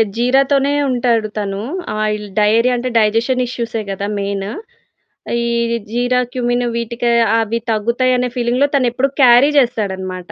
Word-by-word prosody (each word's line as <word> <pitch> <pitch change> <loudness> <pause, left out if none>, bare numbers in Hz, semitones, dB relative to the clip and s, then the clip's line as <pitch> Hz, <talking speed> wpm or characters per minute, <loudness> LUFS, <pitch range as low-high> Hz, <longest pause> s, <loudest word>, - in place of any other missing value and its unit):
జీరా 250 +3 +3
తోనే 280 0 +2 0.2
ఉంటాడు. 235 -3 +1
తను 200 -1 -3 0.4
ఆయిల్ 210 0 -2
డయేరియా 230 +4 +3
అంటే 250 +1 -3
డైజెషన్ 230 +4 +1
ఇష్యూసే 235 -2 -4
కదా! 200 +1 -4
మెయిను. 200 0 -3 0.9
ఈ - - -1 0.4
జీరా, 245 +2 +1
క్యుమిన్ 245 -1 0
వీటికి 235 +1 -2 0.3
అవి 225 +1 -1
తగ్గుతాయి 235 +4 +1
అనే 250 0 -1
ఫీలింగ్‌లో 245 +4 +1
తనెప్పుడు 255 +1 0
క్యారీ 250 +4 +6
చేస్తాడనమాట. 190 -7 -3
235 Hz, 130 wpm, -17 LUFS, 210-250 Hz, 0.9 s, క్యారీ